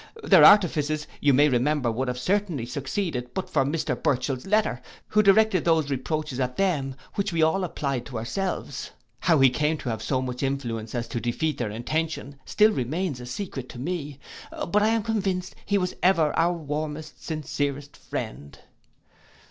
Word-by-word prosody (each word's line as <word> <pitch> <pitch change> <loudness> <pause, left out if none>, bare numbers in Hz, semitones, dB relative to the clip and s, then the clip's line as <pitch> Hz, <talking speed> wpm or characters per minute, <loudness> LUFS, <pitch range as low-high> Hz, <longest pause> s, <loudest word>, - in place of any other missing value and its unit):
Their 185 -6 +7
artifices, 155 -5 +5
you 145 - +4
may 145 +3 +5
remember 130 -1 +1
would 130 +4 -2
have 125 0 -2
certainly 180 - 0
succeeded, 135 -1 -3
but 190 - -2
for - - +3
Mr 150 +4 -1
Burchell's 130 -2 -1
letter, 205 - +1 0.3
who 210 - +4
directed 200 -2 +4
those 160 -4 +2
reproaches 140 +1 -2
at 125 -1 -2
them, 145 -9 0 0.2
which 200 -2 -1
we 165 -2 +2
all 185 +5 +2
applied 140 -7 -3
to 125 - -6
ourselves. 185 - -3 0.3
How 165 -3 +3
he 135 -1 +6
came 150 +4 0
to 130 - -5
have 110 -1 -3
so 130 +4 0
much 125 -1 -4
influence 120 -5 -3
as 120 -1 -2
to 120 - -2
defeat 145 +5 -1
their 105 - -1
intentions, 150 +6 -3
still 215 +1 +4
remains 150 - -2
a 125 - -8
secret 135 -3 -5
to - - -10
me; 150 -2 -4 0.5
but 210 +4 +3
I 210 - +4
am 225 -1 +1
convinced 195 -4 -1
he 205 - +2
was 180 -2 -1
ever 170 -5 +3
our 170 +2 +3
warmest 155 -1 -5
sincerest 145 -2 -3
friend. 70 +3 -6
150 Hz, 170 wpm, -25 LUFS, 130-180 Hz, 0.5 s, Their